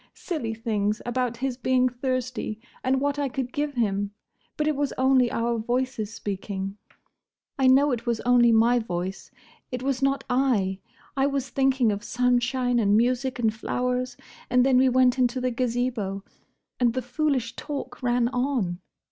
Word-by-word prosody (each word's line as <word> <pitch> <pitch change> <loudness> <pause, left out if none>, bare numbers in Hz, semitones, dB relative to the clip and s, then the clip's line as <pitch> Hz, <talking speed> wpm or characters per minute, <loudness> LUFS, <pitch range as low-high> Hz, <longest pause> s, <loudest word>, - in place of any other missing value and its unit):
Silly 240 - -4
things; 215 -2 -1
about 245 -1 -1
his 260 0 -2
being 255 0 +2
thirsty, 250 -3 -3 0.2
and 260 +1 +2
what 285 +1 -1
I 280 -2 0
could 250 -1 -4
give 290 -1 -2
him. 205 -3 -1 0.4
But 300 - 0
it 305 - +1
was 285 0 -1
only 260 -1 +4
our 230 0 0
voices 240 -2 -2
speaking. 195 -1 -4 0.8
I 265 - +4
know 275 +3 +5
it 240 -1 -3
was 235 -2 +1
only 240 -1 +5
my 230 +2 +4
voice: 185 -3 -4 0.4
it 250 0 -4
was 270 -1 -1
not 275 0 +1
I. 240 -8 +1 0.4
I 270 0 +2
was 275 -2 -2
thinking 265 -3 +2
of 205 +1 -4
sunshine 245 0 +1
and 205 -1 +3
music 250 +2 +1
and 225 -3 +1
flowers. 250 +3 -2 0.3
And 250 0 +4
then 265 -2 +4
we 260 +1 +5
went 255 0 +3
into 250 0 +2
the 255 0 0
Gazebo; 235 -5 -2 0.6
and 240 -1 +2
the 255 - -1
foolish 255 -3 -1
talk 275 -4 -6
ran 245 -1 +2
on! 245 -9 -1
250 Hz, 165 wpm, -25 LUFS, 230-260 Hz, 0.8 s, know